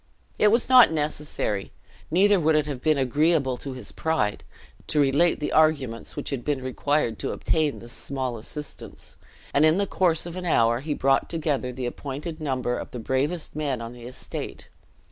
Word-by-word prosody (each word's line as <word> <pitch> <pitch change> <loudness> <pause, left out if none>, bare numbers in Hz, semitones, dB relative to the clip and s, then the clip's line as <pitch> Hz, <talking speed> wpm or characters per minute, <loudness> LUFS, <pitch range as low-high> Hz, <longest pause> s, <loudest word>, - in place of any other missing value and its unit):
It 210 - +5
was 230 +3 +3
not 255 -6 +8
necessary, 150 -9 -2 0.4
neither 195 +4 +4
would 160 -1 +3
it 150 -1 +2
have 140 -4 -5
been 155 0 +2
agreeable 140 +1 +2
to 135 +1 -6
his 125 -5 -7
pride, 160 -11 -1 0.4
to 150 - +1
relate 145 +5 +3
the 150 - -2
arguments 140 -7 +1
which - - -4
had 130 -3 -3
been 145 -3 -1
required 130 -1 0
to - - -2
obtain 155 -3 0
this 120 - -10
small 130 -3 -3
assistance; 150 +6 -6 0.4
and 145 - +4
in 155 +2 +5
the 200 - +1
course 175 -5 +1
of 170 0 -7
an 185 -1 -5
hour 115 -6 +3
he 145 +2 -3
brought 135 0 +2
together 150 -6 -1
the 125 0 -5
appointed 145 +6 -6
number 130 -4 -1
of - - -7
the - - -7
bravest 140 +9 -2
men 145 -5 -1
on 115 +1 -7
the 120 -1 -10
estate. 130 - -7
145 Hz, 185 wpm, -25 LUFS, 130-160 Hz, 0.4 s, not